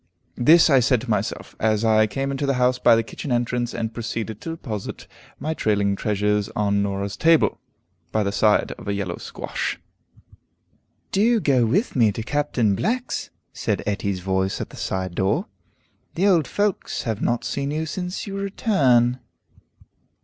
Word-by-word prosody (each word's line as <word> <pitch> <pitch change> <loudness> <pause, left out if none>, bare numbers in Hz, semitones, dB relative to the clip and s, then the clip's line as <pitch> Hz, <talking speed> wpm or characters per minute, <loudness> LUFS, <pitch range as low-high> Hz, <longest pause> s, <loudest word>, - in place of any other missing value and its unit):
This 160 +7 +7
I 135 -4 +5
said 125 -1 +2
to - - -8
myself, - - -2
as 110 0 +1
I 110 -1 +4
came 135 +6 -2
into 140 +1 -2
the 140 - +2
house 125 0 +2
by 120 - +6
the 115 - +1
kitchen 130 +4 -7
entrance, 120 0 0
and 110 0 -3
proceeded 110 -2 -4
to - - -6
deposit 120 -11 -6 0.3
my 155 +4 -2
trailing 100 -7 +1
treasures 105 0 0
on 100 -1 +1
Norah's 100 0 -2
table, 165 -1 +3 0.5
by 110 - +1
the 100 - -1
side 105 +1 +2
of - - -11
a 100 - 0
yellow 95 -4 -3
squash. - - -4 1.3
"Do 225 +4 +3
go 130 - +3
with 200 - 0
me 115 -5 +4
to 115 - -4
Captain 125 -5 +1
Black's," 235 - -2 0.2
said - - -2
Etty's 100 -2 -2
voice 95 +1 -1
at - - -5
the - - -11
side 95 -1 -3
door. 95 +3 0 0.7
"The 185 - +1
old 170 -8 +4
folks 205 -2 -1
have 110 -3 -3
not 120 0 0
seen 140 0 -2
you 155 +2 -2
since 180 +3 -4
your 195 -1 -5
return." 130 - +2
120 Hz, 165 wpm, -23 LUFS, 105-150 Hz, 1.3 s, This